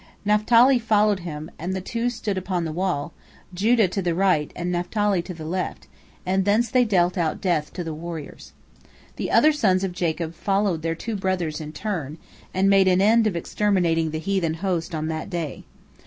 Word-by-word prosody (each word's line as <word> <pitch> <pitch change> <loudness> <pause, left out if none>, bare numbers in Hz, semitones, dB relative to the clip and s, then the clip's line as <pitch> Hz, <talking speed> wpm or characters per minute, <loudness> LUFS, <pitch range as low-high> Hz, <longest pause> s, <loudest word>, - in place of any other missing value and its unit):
Naphtali 230 +5 +5
followed 210 -3 +2
him, 155 -3 -7
and 180 +4 -3
the - - -2
two 230 +6 -2
stood 220 -4 -3
upon 185 -2 -2
the 160 - -3
wall, 175 -4 -2 0.4
Judah 215 +3 +3
to 195 +2 -2
the 170 -2 -1
right 180 -5 +2
and 175 +1 -3
Naphtali 185 +2 0
to 180 - -8
the 160 -1 -8
left, 180 +3 -3 0.4
and 190 +1 +1
thence 210 +4 +2
they 255 -1 +4
dealt 180 -4 +1
out 160 -3 0
death 165 -5 0
to 180 - -4
the 165 -1 -5
warriors. 160 -1 -8 0.7
The - - -3
other 310 - +5
sons 195 -10 +2
of 190 - -1
Jacob 170 -2 -2
followed 195 -2 0
their 165 0 -1
two 225 +6 -4
brothers 180 -5 -2
in 155 0 -7
turn, 160 -6 -4 0.3
and 190 +1 +1
made 195 -1 +5
an 185 0 +4
end 220 +3 +4
of 200 - -1
exterminating 170 -3 +1
the 155 - -3
heathen 165 -1 -1
host 175 -1 -2
on 155 0 -2
that 160 +3 -4
day. 170 -6 -4
185 Hz, 190 wpm, -23 LUFS, 165-205 Hz, 0.7 s, Naphtali